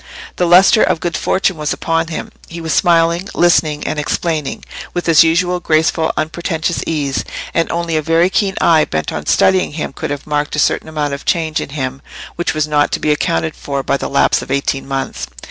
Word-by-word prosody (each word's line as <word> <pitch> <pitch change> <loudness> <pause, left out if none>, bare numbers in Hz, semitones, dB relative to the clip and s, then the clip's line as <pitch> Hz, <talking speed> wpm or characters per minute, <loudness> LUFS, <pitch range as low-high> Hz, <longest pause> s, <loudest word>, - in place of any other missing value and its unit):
The 180 - +1
lustre 185 +5 +6
of 185 -3 +2
good 175 0 -3
fortune 190 -2 0
was 150 -1 -1
upon 165 0 -1
him; 165 - -6 0.2
he 170 - -8
was 160 -1 -2
smiling, 170 +2 +2
listening, 155 -4 +2
and 155 - -2
explaining, 155 -1 -2 0.3
with 175 - -2
his 165 -1 +6
usual 175 +2 +1
graceful 160 0 +1
unpretentious 165 +1 -2
ease, 145 -4 -1 0.3
and 165 - 0
only 170 -1 -2
a 155 - +1
very 165 +4 +2
keen 195 -1 0
eye 160 -2 +4
bent 80 - -3
on - - -5
studying 185 -5 +3
him 150 -3 -4
could - - -5
have 145 -1 -5
marked 150 -1 -1
a - - -5
certain 150 - +1
amount 150 -2 -2
of 140 - -6
change 160 -3 0
in - - -6
him 135 -2 -4 0.3
which 175 - -2
was 155 -1 0
not 145 -1 +1
to - - 0
be 150 - +1
accounted 80 - -1
for 140 -1 -4
by 140 - 0
the - - -3
lapse 140 - +2
of - - -9
eighteen 135 0 -1
months. 135 - -3
160 Hz, 205 wpm, -16 LUFS, 145-170 Hz, 0.3 s, lustre